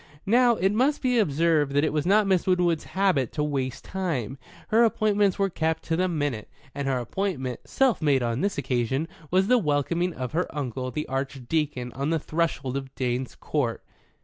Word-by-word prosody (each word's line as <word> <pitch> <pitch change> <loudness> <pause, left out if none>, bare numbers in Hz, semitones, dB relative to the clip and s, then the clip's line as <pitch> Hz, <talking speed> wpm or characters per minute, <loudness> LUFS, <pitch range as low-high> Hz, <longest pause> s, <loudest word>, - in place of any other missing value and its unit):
Now, 240 +3 +4
it 190 -1 +1
must 260 +8 +1
be 250 -2 +3
observed 155 -5 +2
that 145 +1 +3
it 155 - 0
was 150 +1 0
not 210 +2 +4
Miss 190 -2 +1
Winwood's 175 -3 +2
habit 185 - +1
to 150 - -1
waste 135 -4 -2
time. 145 - -3 0.3
Her 225 +2 +5
appointments 210 -3 +2
were 195 -1 +1
kept 160 -1 -1
to 165 - -1
the 185 +2 +1
minute, 145 - -2 0.2
and 140 -1 -3
her 135 -1 +1
appointment 130 - -3
(self 265 -7 +1
made 140 -4 +3
on 120 +3 -1
this 200 -3 -1
occasion) 135 +2 -1 0.2
was 190 +1 +3
the 250 +4 +4
welcoming 170 +2 0
of 125 -2 -4
her 175 +3 0
uncle, 130 -2 -3
the 150 +3 -4
Archdeacon, 135 0 -2
on 140 +3 -2
the 165 - +2
threshold 155 -4 -2
of 135 -1 -7
Drane's 125 0 -2
Court. 130 -7 -2
155 Hz, 185 wpm, -26 LUFS, 135-190 Hz, 0.3 s, Her